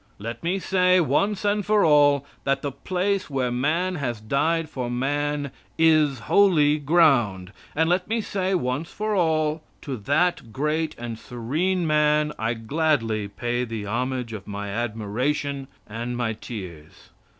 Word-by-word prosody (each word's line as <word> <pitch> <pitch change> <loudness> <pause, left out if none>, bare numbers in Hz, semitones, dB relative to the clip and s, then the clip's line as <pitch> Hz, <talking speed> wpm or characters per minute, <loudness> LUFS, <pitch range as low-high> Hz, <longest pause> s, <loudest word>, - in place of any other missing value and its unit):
Let 115 +2 -6
me 175 +3 0
say, 185 -1 +3
once 190 +7 +1 0.2
for 210 +1 +3
all, 145 -2 +5 0.2
that 135 0 0
the 145 - -2
place 185 +7 -1
where 130 -3 -1
man 165 +9 0
has 120 -6 -3
died 155 +9 0
for 130 -5 -4
man 145 +3 -1 0.3
is 155 -6 +4
holy 155 - +4
ground; 135 - +3 0.2
and 160 +2 +2
let 180 +1 +1
me 225 +2 0
say, 195 -3 -1
once 135 +1 -2
for 215 0 -3
all, 160 -4 +1 0.2
to 135 - -4
that 145 - 0
great 155 +5 -1
and 115 -1 -6
serene 160 +12 -1
man 150 -1 +2
I 115 +2 0
gladly 115 -4 0
pay 120 +4 -2
the 115 -3 -5
homage 125 +2 -2
of 100 -3 -8
my 100 0 -5
admiration 120 +6 -2 0.2
and 120 +3 -5
my 115 -2 -1
tears. 90 -9 -9
145 Hz, 145 wpm, -24 LUFS, 120-165 Hz, 0.3 s, all